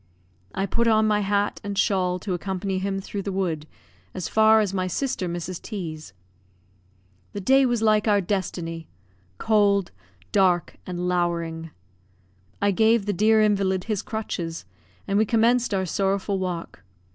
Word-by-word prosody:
I 195 +1 0
put 235 +4 0
on 220 -1 +4
my 210 -1 +2
hat 205 0 0
and 200 -1 -4
shawl 185 -3 +1
to 190 - -3
accompany 190 +1 -2
him 195 0 -2
through 200 +1 -5
the 200 - -4
wood 170 -5 -2 0.5
as 185 -3 -3
far 220 0 +5
as 205 -3 0
my 185 -1 -1
sister 185 -2 -2
Mrs. 175 +1 -5
T 185 -8 -5
's. 155 0 -12 1.2
The 205 - -4
day 265 +7 +4
was 240 -2 0
like 215 0 +3
our 205 -1 +4
destiny, 170 -4 -3 0.5
cold, 205 -3 +2 0.4
dark, 185 -3 +2
and 180 0 -3
lowering. 170 -2 -1 0.9
I 200 0 +2
gave 220 +1 +3
the 205 - 0
dear 215 +3 +4
invalid 195 -3 +1
his 215 -2 -2
crutches, 175 -7 -5 0.4
and 200 +1 +2
we - - +5
commenced 235 +2 +2
our 190 -2 0
sorrowful 195 +2 -1
walk. 175 - -5
195 Hz, 155 wpm, -24 LUFS, 180-215 Hz, 1.2 s, far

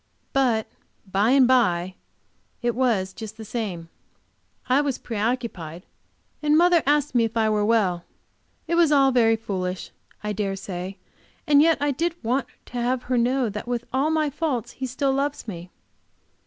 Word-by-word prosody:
But 245 -5 +2 0.5
"by 200 +4 +2
and 265 -1 +6
by" 185 -8 +2 0.7
it 240 0 +1
was 225 -7 +1
just 220 0 -8
the 220 - -8
same. 200 -7 -4 0.8
I 260 +3 +4
was 280 -3 -1
preoccupied, 210 -7 -3 0.6
and 300 0 +3
mother 345 0 +5
asked 290 -1 +2
me 240 -2 +3
if 225 0 -2
I 220 -1 +2
were 210 -1 +1
well. 200 -6 +1 0.6
It - - -1
was 335 -3 +4
all 275 -2 +5
very 230 -3 +4
foolish 185 -4 -4 0.3
I 210 0 -2
dare 200 -1 -2
say, 190 0 -6 0.5
and 290 -1 +5
yet 325 0 +4
I 290 0 +1
did 335 +5 -1
want 250 +3 0 0.2
to 245 - -5
have 250 +1 0
her 250 0 0
know 250 +1 +1
that 210 +3 -6
with 240 -1 -2
all 270 +4 +2
my 310 -2 +1
faults 275 -6 -2
he 265 - -5
still 270 +2 0
loves 280 -1 -2
me. 175 -3 -7
240 Hz, 170 wpm, -24 LUFS, 210-275 Hz, 0.8 s, and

